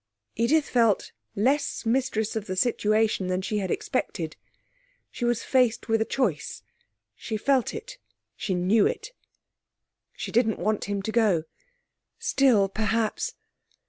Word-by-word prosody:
Edith 285 +7 +2
felt 230 -5 +2 0.2
less 270 +8 +1
mistress 225 -3 0
of 220 -2 -3
the 185 - -3
situation 215 -2 +1
than 185 +1 -1
she 210 +1 -1
had 190 -2 -3
expected. 170 - -2 0.8
She 240 - -3
was 240 -1 +1
faced 250 -4 +2
with 225 0 +3
a - - +2
choice; 200 - -2 0.5
she 220 - -4
felt 265 +2 +2
it; 460 +3 -8 0.4
she 190 - -2
knew 195 +4 +3
it. - - -4 1.0
She - - -6
didn't 225 -2 +2
want 215 +3 -1
him 200 -1 -3
to 220 - -2
go. 210 -8 +3 0.7
Still, 240 -8 +3
perhaps.... 220 - -1
220 Hz, 135 wpm, -26 LUFS, 200-245 Hz, 1.0 s, with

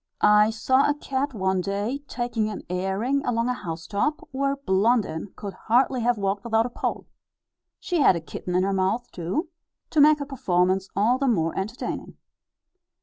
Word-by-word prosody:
I 210 +1 +6
saw 260 +5 +2
a 290 - +1
cat 275 -2 -3
one 190 -2 0
day, 205 +8 -2
taking 240 -4 -2
an 210 - -6
airing 195 +10 0
along 230 0 0
a - - +1
housetop, 200 - -3
where 275 +1 0
Blondin 205 - +1
could 200 -2 -6
hardly 250 +2 +1
have 240 0 +2
walked 200 0 -1
without 225 -1 +2
a 245 - -5
pole. - - -3 0.7
She 350 -2 -1
had 260 - +5
a - - -2
kitten 175 +2 -6
in 185 - +3
her 195 +1 0
mouth, 195 +6 0
too, 190 - -3 0.4
to 305 - +4
make 305 +1 +7
her 285 - -4
performance 190 -8 0
all 230 +6 +2
the 275 - +1
more 165 -9 +1
entertaining. 215 +7 -4
220 Hz, 170 wpm, -25 LUFS, 190-260 Hz, 0.7 s, make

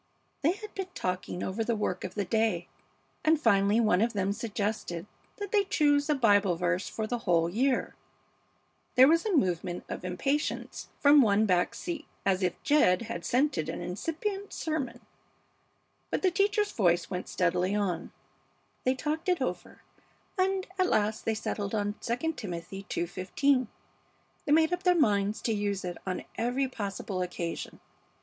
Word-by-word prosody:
"They 315 +5 +3
had 420 +1 -10
been 385 -1 -4
talking 180 0 -3
over 205 +4 -2
the 235 +1 0
work 210 -4 -2
of 185 - -6
the 205 -2 -1
day, 215 -4 +1 0.6
and 315 0 +4
finally 205 -3 +4
one 215 -5 +3
of 230 +1 +1
them 200 -1 0
suggested 205 -5 -3 0.3
that 405 -2 -5
they 415 -2 +4
choose 290 -5 +2
a 300 - +4
Bible 205 -7 +4
verse 180 +2 -1
for 220 - -3
the 240 +2 -2
whole 170 -7 +2
year 250 +9 0 0.5
" - - -41
There 260 +1 +8
was 335 +6 +3
a 385 -6 +2
movement 180 - 0
of - - -6
impatience 275 +12 -2
from 290 0 +7
one 215 -2 +4
back 180 -3 +2
seat, 325 -3 -5 0.2
as 195 -1 +2
if 180 -2 -1
Jed 235 -11 +4
had 175 -7 -5
scented 245 - +1
an - - -4
incipient 330 - -4
sermon, 310 -6 -3 1.1
but - - -2
the 370 - +4
teacher's 410 +2 +2
voice 175 -4 +1
went 180 -1 -4
steadily 180 +2 +1
on: 190 -5 -1 0.7
"They 255 +1 +3
talked 310 +6 -2
it 360 - +2
over, - - -4 0.5
and 380 0 +1
at 370 - +3
last 215 +1 +1
they 225 - +1
settled 205 -1 -3
on 205 -1 0 0.2
II 285 +8 0
Timothy 195 - -7
ii:15. 225 +10 0 0.8
They - - -1
made 320 +2 +5
up 355 - -1
their 360 -1 +4
minds 210 - +2
to 225 - +1
use 205 -2 -1
it 175 -1 -5
on 185 - -3
every 250 +4 +1
possible 200 -5 -4
occasion. 175 -2 -4
220 Hz, 165 wpm, -29 LUFS, 185-295 Hz, 1.1 s, There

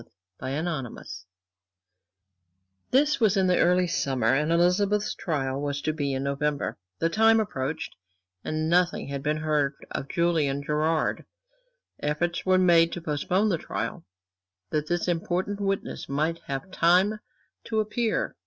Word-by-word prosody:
Chapter 135 +5 -3
XXXIV 135 - -5 1.6
This 290 +3 +3
was 215 -3 +3
in 190 - +3
the 180 -1 +3
early 180 +1 +4
summer; 135 -8 +1
and 150 +4 +1
Elizabeth's 195 +5 +2
trial 135 -5 -2
was 145 -1 -2
to 155 - 0
be 145 -3 -2
in 130 - -2
November. 140 +1 -1 0.2
The 165 - +1
time 225 +5 +4
approached, 155 -7 -3 0.5
and 155 0 -2
nothing 175 -2 +2
had 140 -1 -4
been 150 +2 0
heard 150 -2 0 0.2
of 135 - -4
Julian 155 -5 +1
Gerard. 155 +2 0 0.8
Efforts 170 +4 -1
were 185 0 +5
made 170 -2 +5
to 175 - -5
postpone 180 +7 0
the 170 -5 0
trial, 110 - -4 0.7
that 150 0 -1
this 175 +2 -1
important 180 +4 -1
witness 195 -1 -2
might 155 +4 0
have 140 +6 -4
time 185 +5 +3 0.5
to 220 -1 -1
appear. 215 +1 -1
165 Hz, 140 wpm, -26 LUFS, 145-185 Hz, 1.6 s, were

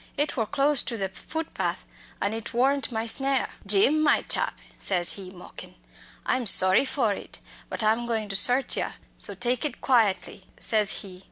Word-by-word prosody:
It 290 +1 -2
wor 225 -5 -2
close 280 +3 +1
to 235 - -4
the 195 -2 -3
footpath, 320 - -5 0.3
and 200 +2 -2
it 225 +1 -7
worn't 270 +2 0
my 225 -1 -3
snare." 270 +3 +1 0.2
"'Jim, 215 +10 +2
my 300 - +2
chap,' - - -2 0.2
says 175 -3 +5
he, 190 -2 -8
mockin', 180 -1 -12 0.5
'I'm 255 -3 -1
sorry 190 +5 +4
for 245 -6 -1
it, - - -9 0.3
but - - -4
I'm 225 +2 0
going 220 -2 -2
to 195 - -4
search 250 +6 +3
yer, - - -4 0.2
so - - +7
take 245 0 -1
it 300 - -4
quietly,' 215 -6 0
says 215 -2 +3
he. 185 -2 -12
225 Hz, 175 wpm, -25 LUFS, 200-270 Hz, 0.5 s, so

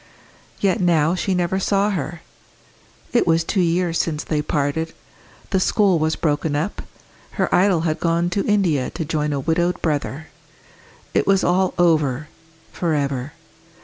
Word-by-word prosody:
Yet 200 +1 +1
now 165 -2 +3
she 185 +1 -1
never 180 +1 0
saw 200 +2 +1
her. 170 -2 -4 0.9
It 240 - +3
was 165 0 +3
two 190 +3 0
years 170 0 +1
since 155 -2 -3
they 150 -2 -1
parted; 150 +2 -2 0.6
the 190 - +2
school 190 -2 +3
was 160 +1 +1
broken 150 -1 -1
up; 165 +8 -2 0.5
her - - -1
idol 185 -2 +4
had 160 -1 -1
gone 170 +1 +1
to 195 +2 0
India 180 -11 +1
to 160 -1 -5
join 150 0 -1
a 140 - -1
widowed 175 +5 0
brother. 155 -1 -2 0.8
It - - +1
was 195 -1 +3
all 185 +1 +1
over 155 -5 +2 0.4
for 165 -3 -1
ever. 140 -1 -2
165 Hz, 150 wpm, -21 LUFS, 150-185 Hz, 0.9 s, idol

